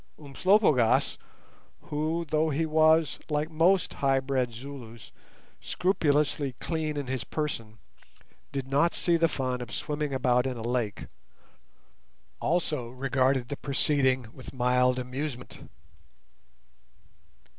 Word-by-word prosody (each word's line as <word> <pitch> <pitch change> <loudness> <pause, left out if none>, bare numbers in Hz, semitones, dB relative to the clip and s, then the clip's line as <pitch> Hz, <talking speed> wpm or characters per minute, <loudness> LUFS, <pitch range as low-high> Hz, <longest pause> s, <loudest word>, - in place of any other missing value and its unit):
Umslopogaas, 150 - +2 0.6
who, 155 +3 -2
though 155 +1 +1
he 155 +2 0
was, 160 0 +3
like 150 +1 -1
most 175 +4 +3
high 135 -1 +2
bred 130 -2 -1
Zulus, 120 -2 -10 0.5
scrupulously 150 -6 0
cleanly 155 +1 -3
in - - -9
his 130 -1 -3
person, 115 -8 -4 0.7
did 135 -2 -4
not 145 +5 +2
see 170 - +2
the 165 0 +3
fun 130 -4 -2
of 120 -1 -7
swimming 150 -1 -3
about 125 -1 +2
in 125 -2 -3
a 115 - -6
lake, 120 -3 -2 1.3
also 150 -7 -1
regarded 130 0 0
the 145 - -4
proceeding 135 -2 +1
with 130 0 -11
mild 125 0 +2
amusement. 125 0 -5
135 Hz, 115 wpm, -28 LUFS, 125-155 Hz, 1.3 s, was